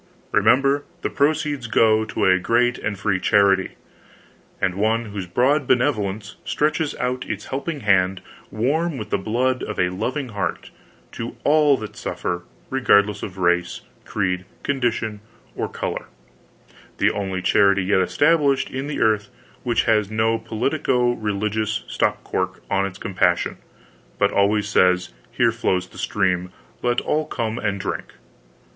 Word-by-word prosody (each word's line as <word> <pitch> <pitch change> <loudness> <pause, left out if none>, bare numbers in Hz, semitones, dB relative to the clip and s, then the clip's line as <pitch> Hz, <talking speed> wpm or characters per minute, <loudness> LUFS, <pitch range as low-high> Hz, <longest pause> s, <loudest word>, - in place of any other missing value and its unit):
ReMember, 135 +7 +4 0.2
the - - -1
proceeds 145 -3 0
go 110 -1 +3
to - - -1
a 95 -1 +5
great 120 +5 +2
and 105 -1 -3
free 95 -1 0
charity, 100 -1 +3 0.9
and 95 - +1
one 110 +4 +1
whose 100 -3 -6
broad 130 - +2
begevolence 105 -5 0
stretches 150 0 0
out 125 0 -3
its 105 -1 -4
help 140 +5 -3
ing 150 -4 -4
hand, 95 -2 +2 0.3
warm 145 +8 0
with 105 - -7
the - - +1
blood 125 +6 0
of 105 - -5
a 90 - +3
lov 120 +10 -2
ing 135 -4 -4
heart, 105 -3 -4 0.4
to 115 - -6
all 150 -2 +4
that 110 -2 -8
suffer, 90 0 -3 0.3
regardless 105 -6 +3
of 95 -1 -7
race, 90 -1 +1 0.2
creed, 90 -2 -1 0.2
condition 120 -6 -1 0.4
or - - -2
color—the - - -5
only 95 -2 -3
charity 100 0 +4
yet 95 0 +2
established 145 - +2
in 135 +2 -4
the 150 - -3
earth 105 -2 +2 0.3
which 120 -1 +1
has 105 -3 +2
no 110 +1 +1
politico 120 +2 0
religious 110 -1 -2
stop - - 0
cock 95 0 -3
on 100 0 +2
its 95 -1 -9
compassion, 90 -4 0 0.6
but - - +2 0.3
says 90 -3 +2 0.2
Here 120 -1 +3
flows 95 -6 -1
the - - -13
stream, 90 -3 0 0.3
let 120 0 +1
ALL 155 0 -1
come 115 -4 -3
and 100 -3 -1
drink! - - -4
110 Hz, 145 wpm, -22 LUFS, 95-125 Hz, 0.9 s, a